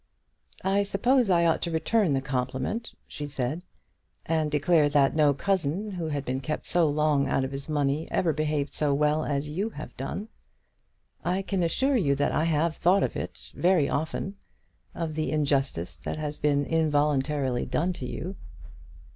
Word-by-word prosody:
"I 195 Hz, +1 st, +2 dB
suppose 240 Hz, +4 st, +2 dB
I 170 Hz, -2 st, +4 dB
ought 165 Hz, -, +2 dB
to 170 Hz, -, -1 dB
return 170 Hz, +2 st, +2 dB
the 135 Hz, -1 st, 0 dB
compliment," 130 Hz, -, -2 dB, 0.2 s
she 145 Hz, -, -6 dB
said, 140 Hz, +3 st, -3 dB, 0.6 s
"and 160 Hz, -1 st, +1 dB
declare 150 Hz, +1 st, +3 dB
that 140 Hz, -1 st, +3 dB
no 150 Hz, -2 st, +5 dB
cousin 190 Hz, +3 st, -1 dB
who 175 Hz, -4 st, -3 dB
had 145 Hz, -2 st, -3 dB
been 130 Hz, +1 st, -1 dB
kept 150 Hz, +3 st, -4 dB
so 170 Hz, -3 st, +3 dB
long 145 Hz, -2 st, +2 dB
out 135 Hz, -, +1 dB
of 130 Hz, -, -3 dB
his 140 Hz, +2 st, -6 dB
own 155 Hz, -, -1 dB
money 145 Hz, +2 st, 0 dB
ever 165 Hz, -3 st, +1 dB
behaved 150 Hz, -1 st, -1 dB
so 145 Hz, -2 st, +1 dB
well 150 Hz, +2 st, +2 dB
as 145 Hz, 0 st, -1 dB
you 190 Hz, +9 st, -2 dB
have 150 Hz, -8 st, -9 dB
done. 165 Hz, -, -4 dB, 1.0 s
I 185 Hz, +2 st, 0 dB
can 195 Hz, -1 st, -1 dB
assure 265 Hz, -, +2 dB
you 140 Hz, -10 st, +2 dB
that 145 Hz, +1 st, +1 dB
I 155 Hz, -, +1 dB
have 160 Hz, 0 st, +1 dB
thought 190 Hz, +3 st, +4 dB
of -, -, -1 dB
it -, -, -6 dB
very 175 Hz, -5 st, +3 dB
often, 160 Hz, +6 st, -2 dB, 0.6 s
of 165 Hz, -2 st, -3 dB
the 155 Hz, 0 st, -1 dB
injustice 140 Hz, -, 0 dB
that -, -, -5 dB
has 150 Hz, -1 st, -4 dB
been 145 Hz, -1 st, +2 dB
involuntarily 145 Hz, -4 st, +1 dB
done 180 Hz, +3 st, 0 dB
to 130 Hz, -7 st, -6 dB
you." 185 Hz, +9 st, -5 dB
155 Hz, 175 wpm, -27 LUFS, 140-175 Hz, 1.0 s, no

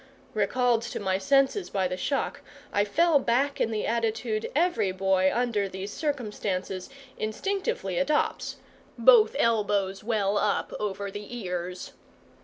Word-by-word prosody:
Recalled 235 Hz, +3 st, +2 dB
to 235 Hz, -, -5 dB
my 190 Hz, -1 st, 0 dB
senses 280 Hz, -, +2 dB
by 190 Hz, -2 st, 0 dB
the 180 Hz, -, -3 dB
shock, 275 Hz, +9 st, -2 dB, 0.3 s
I 205 Hz, -, +3 dB
fell 320 Hz, +8 st, +3 dB
back 270 Hz, +3 st, +1 dB
in -, -, +2 dB
the 215 Hz, -2 st, -2 dB
attitude 225 Hz, -1 st, -1 dB
every 285 Hz, -, +2 dB
boy 190 Hz, 0 st, +2 dB
under 230 Hz, -5 st, 0 dB
these 190 Hz, +2 st, -6 dB
circumstances 210 Hz, -, -3 dB, 0.3 s
instinctively 395 Hz, -, -2 dB
adopts -, -, 0 dB, 0.4 s
both 475 Hz, -, +6 dB
elbows 205 Hz, -5 st, +1 dB
well 205 Hz, -2 st, +1 dB
up 210 Hz, -, 0 dB
over 200 Hz, -1 st, -3 dB
the 205 Hz, +4 st, -7 dB
ears. 180 Hz, -3 st, -5 dB
215 Hz, 130 wpm, -27 LUFS, 195-260 Hz, 0.4 s, both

